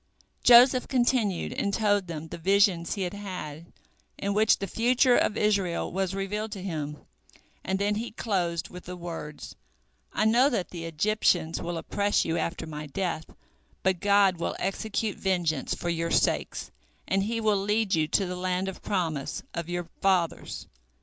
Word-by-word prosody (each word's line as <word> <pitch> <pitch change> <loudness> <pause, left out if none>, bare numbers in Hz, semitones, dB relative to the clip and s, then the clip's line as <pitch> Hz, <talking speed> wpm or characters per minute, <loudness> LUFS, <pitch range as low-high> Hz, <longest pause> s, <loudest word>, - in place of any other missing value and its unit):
Joseph 250 +1 +7
continued 240 -7 +1
and 200 - -1
told 205 -2 +1
them 160 -1 -6
the - - -7
visions 190 -1 +3
he 195 - -2
had 180 +1 -3
had, 180 -6 -7 0.5
in 200 0 -1
which 215 +1 +4
the 195 - -3
future 245 +4 +3
of 215 - +2
Israel 200 -5 +1
was 190 +1 -1
revealed 210 +3 -3
to 195 -3 -7
him, 150 -5 -4 0.7
and 190 +1 -1
then 200 +1 +1
he 225 +3 -3
closed 175 -7 -2
with 180 0 -10
the 180 - -6
words: 165 -4 -7 0.6
"I 215 - 0
know 240 +5 +5
that 195 - -2
the 170 -2 -6
Egyptians 165 -1 +1
will 175 0 -3
oppress 200 +5 0
you 165 - -1
after 170 0 -2
my 150 -1 -6
death, 170 0 -2 0.6
but 190 -2 +2
God 200 -2 +4
will - - -2
execute 210 +2 -2
vengeance 175 -7 0
for 175 - -4
your 165 0 -1
sakes, - - 0 0.4
and 195 - +2
He 225 +3 -1
will 215 -2 +2
lead 210 0 +1
you 155 -1 +2
to 195 - +1
the 180 0 -4
land 185 +1 -1
of 190 - -6
promise 165 -8 -2
of 170 0 -4
your 175 -1 -3
fathers. 185 -4 0
190 Hz, 170 wpm, -27 LUFS, 170-210 Hz, 0.7 s, Joseph